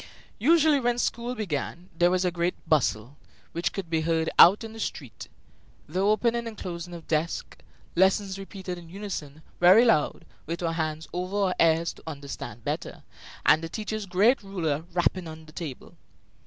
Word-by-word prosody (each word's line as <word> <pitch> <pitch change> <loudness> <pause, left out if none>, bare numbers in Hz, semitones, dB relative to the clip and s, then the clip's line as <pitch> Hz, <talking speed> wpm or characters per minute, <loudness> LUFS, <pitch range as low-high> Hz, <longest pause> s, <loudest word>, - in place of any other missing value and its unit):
Usually, 305 +3 +5
when 240 -1 +1
school 240 0 -1
began, 175 - -4
there 175 +1 +4
was 185 0 +1
a 180 - +2
great 175 +1 -1
bustle, 135 -3 +1 0.3
which 170 +1 -1
could 195 -3 -5
be 160 -1 0
heard 160 0 0
out 195 +6 +8
in 225 -1 -7
the 225 - -10
street, 135 - -5 0.6
the 175 +5 -3
opening 230 +4 +2
and 220 -2 -7
closing 175 -1 -6
of 165 - -11
desks, 160 +1 -2 0.4
lessons 190 +2 +2
repeated 190 -2 -6
in 170 -1 -13
unison, 165 -6 -6 0.2
very 185 +7 +7
loud, 185 -11 +2 0.2
with 170 +2 -4
our 165 -1 0
hands 160 -1 -3
over 185 +3 -3
our 195 -3 +1
ears 165 0 +3
to - - -18
understand 140 -7 -7
better, - - -4 0.4
and 155 - +6
the 165 - -4
teacher's 215 +1 -4
great 205 +8 +3
ruler 165 -6 -2
rapping 175 0 0
on 160 0 -9
the 155 - -14
table. 155 -5 -7
175 Hz, 170 wpm, -27 LUFS, 160-205 Hz, 0.6 s, out